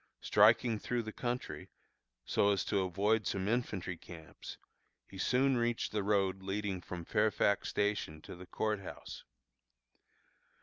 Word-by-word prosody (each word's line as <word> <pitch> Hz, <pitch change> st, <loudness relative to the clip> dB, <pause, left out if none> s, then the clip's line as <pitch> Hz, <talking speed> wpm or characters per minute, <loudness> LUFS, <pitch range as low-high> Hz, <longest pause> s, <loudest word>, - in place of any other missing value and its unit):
Striking 110 Hz, +2 st, +4 dB
through 120 Hz, +1 st, -2 dB
the 110 Hz, -, -6 dB
country, 125 Hz, 0 st, -4 dB, 0.6 s
so 100 Hz, -, +2 dB
as 100 Hz, -3 st, 0 dB
to 100 Hz, -, +1 dB
avoid 100 Hz, +3 st, +1 dB
some 95 Hz, 0 st, -1 dB
infantry 105 Hz, -6 st, -1 dB
camps, 80 Hz, -2 st, -10 dB, 0.5 s
he 95 Hz, -, -11 dB
soon 130 Hz, +5 st, +3 dB
reached 120 Hz, 0 st, 0 dB
the 105 Hz, -, 0 dB
road 95 Hz, -2 st, +1 dB
leading 95 Hz, -1 st, -3 dB
from 85 Hz, -1 st, -7 dB
Fairfax 105 Hz, 0 st, +2 dB
Station 100 Hz, -7 st, -1 dB
to -, -, -9 dB
the 90 Hz, +1 st, -11 dB
Court 105 Hz, +2 st, -1 dB
House. 95 Hz, -, -9 dB
105 Hz, 135 wpm, -33 LUFS, 95-110 Hz, 0.6 s, Striking